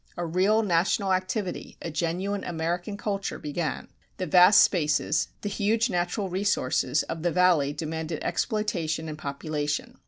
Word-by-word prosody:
A 175 Hz, -, -2 dB
real 190 Hz, +7 st, +2 dB
national 190 Hz, +2 st, +1 dB
activity, 185 Hz, +1 st, -3 dB
a 165 Hz, -, -5 dB
genuine 180 Hz, +5 st, -2 dB
American 175 Hz, +4 st, -3 dB
culture 200 Hz, -1 st, -3 dB
began. 155 Hz, +2 st, -3 dB, 0.3 s
The 185 Hz, -, -2 dB
vast 180 Hz, +4 st, +7 dB
spaces, 155 Hz, -2 st, +1 dB
the -, -, -4 dB
huge 220 Hz, +3 st, +1 dB
natural 180 Hz, +3 st, -1 dB
resources, 180 Hz, -7 st, 0 dB
of 165 Hz, -, -5 dB
the 175 Hz, +1 st, +1 dB
Valley 175 Hz, -5 st, +3 dB
demanded 160 Hz, +1 st, -4 dB
exploitation 170 Hz, -7 st, -1 dB
and 155 Hz, -, -5 dB
population. 150 Hz, 0 st, -4 dB
175 Hz, 135 wpm, -26 LUFS, 160-200 Hz, 0.3 s, vast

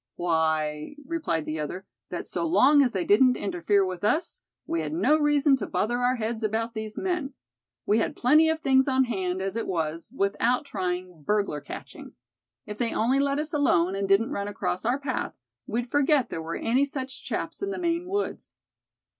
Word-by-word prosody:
"Why," 160 Hz, -, 0 dB
replied 265 Hz, -, -2 dB
the 155 Hz, +1 st, -3 dB
other, 180 Hz, +6 st, -5 dB, 0.2 s
"that -, -, -5 dB
so -, -, -3 dB
long 295 Hz, -3 st, +5 dB
as 255 Hz, -3 st, +2 dB
they 185 Hz, -5 st, -2 dB
didn't 250 Hz, +5 st, +5 dB
interfere 195 Hz, +1 st, +1 dB
with 185 Hz, -1 st, -5 dB
us, 305 Hz, +11 st, 0 dB, 0.2 s
we 165 Hz, -, -1 dB
had 150 Hz, -1 st, -4 dB
no 215 Hz, -, +3 dB
reason 295 Hz, -2 st, +3 dB
to -, -, -4 dB
bother 240 Hz, +3 st, 0 dB
our 250 Hz, +1 st, +2 dB
heads 225 Hz, -1 st, -3 dB
about 225 Hz, +2 st, -1 dB
these 220 Hz, -1 st, -6 dB
men. 350 Hz, -8 st, -2 dB, 0.5 s
We 215 Hz, +2 st, +3 dB
had -, -, -1 dB
plenty 305 Hz, +6 st, +5 dB
of 320 Hz, 0 st, -1 dB
things 265 Hz, -1 st, +4 dB
on 265 Hz, -1 st, +3 dB
hand, 190 Hz, -6 st, -2 dB
as 195 Hz, +1 st, -3 dB
it 230 Hz, -, -2 dB
was, 165 Hz, +1 st, -3 dB
without 235 Hz, +7 st, +1 dB
trying 180 Hz, -, -4 dB
burglar 200 Hz, -4 st, 0 dB
catching. 145 Hz, -, -9 dB, 0.5 s
If 210 Hz, -1 st, -8 dB
they 235 Hz, -2 st, 0 dB
only 255 Hz, +5 st, +2 dB
let 280 Hz, 0 st, +1 dB
us 305 Hz, +2 st, -3 dB
alone, 190 Hz, -, +2 dB
and 195 Hz, 0 st, -2 dB
didn't 200 Hz, +4 st, +3 dB
run 200 Hz, 0 st, -2 dB
across 180 Hz, -2 st, -3 dB
our 245 Hz, +3 st, +2 dB
path, 275 Hz, -2 st, -3 dB, 0.3 s
we'd 235 Hz, +3 st, -1 dB
forget 290 Hz, -2 st, +3 dB
there 165 Hz, -, -3 dB
were 165 Hz, +1 st, -4 dB
any 250 Hz, +4 st, +2 dB
such 265 Hz, -2 st, -5 dB
chaps -, -, -4 dB
in 395 Hz, -, -2 dB
the 390 Hz, -, -3 dB
Maine 340 Hz, 0 st, -1 dB
woods." 405 Hz, +2 st, -3 dB
225 Hz, 190 wpm, -26 LUFS, 185-280 Hz, 0.5 s, long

